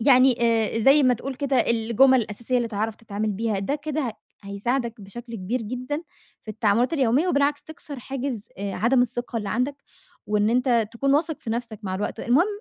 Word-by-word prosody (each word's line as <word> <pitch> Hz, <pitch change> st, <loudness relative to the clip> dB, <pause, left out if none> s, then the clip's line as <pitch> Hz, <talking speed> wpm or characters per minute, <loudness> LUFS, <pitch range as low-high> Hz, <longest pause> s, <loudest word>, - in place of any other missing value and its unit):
يعني 255 Hz, 0 st, +5 dB
آآ، 225 Hz, -1 st, +2 dB
زي 275 Hz, +5 st, +6 dB
ما 255 Hz, -2 st, +4 dB
تقول 265 Hz, +3 st, -5 dB
كده 275 Hz, 0 st, -1 dB
الجُمَل 235 Hz, +3 st, +4 dB
الأساسية 235 Hz, +4 st, -2 dB
اللي 240 Hz, -1 st, 0 dB
تعرف 220 Hz, 0 st, -2 dB
تتعامل 215 Hz, -1 st, -3 dB
بيها، 215 Hz, 0 st, -1 dB
ده 200 Hz, +9 st, -1 dB
كده 305 Hz, 0 st, -3 dB
ه 220 Hz, -, -4 dB, 0.3 s
هيساعدك 230 Hz, +4 st, -2 dB
بشكل 230 Hz, +4 st, -8 dB
كبير 225 Hz, +6 st, -2 dB
جدًا 255 Hz, +7 st, -4 dB, 0.4 s
في 215 Hz, -, -6 dB
التعاملات 225 Hz, +6 st, +2 dB
اليومية، 275 Hz, +3 st, +2 dB
وبالعكس 285 Hz, -2 st, +1 dB
تكسر 295 Hz, -3 st, -9 dB
حاجز 255 Hz, -4 st, -4 dB
آآ، 200 Hz, 0 st, -3 dB
عدم 245 Hz, +3 st, +3 dB
الثقة 240 Hz, 0 st, -3 dB
اللي 210 Hz, -2 st, -4 dB
عندك، 255 Hz, +4 st, -1 dB, 0.5 s
وإن 210 Hz, 0 st, +2 dB
أنت 240 Hz, -3 st, +2 dB
تكون 275 Hz, +4 st, +1 dB
واثق 315 Hz, +1 st, 0 dB
في 230 Hz, -, -5 dB
نَفسك 230 Hz, -2 st, -4 dB
مع 190 Hz, -2 st, -3 dB
الوقت، 205 Hz, -, -3 dB
المهم 275 Hz, -, +3 dB
240 Hz, 185 wpm, -24 LUFS, 220-270 Hz, 0.5 s, زي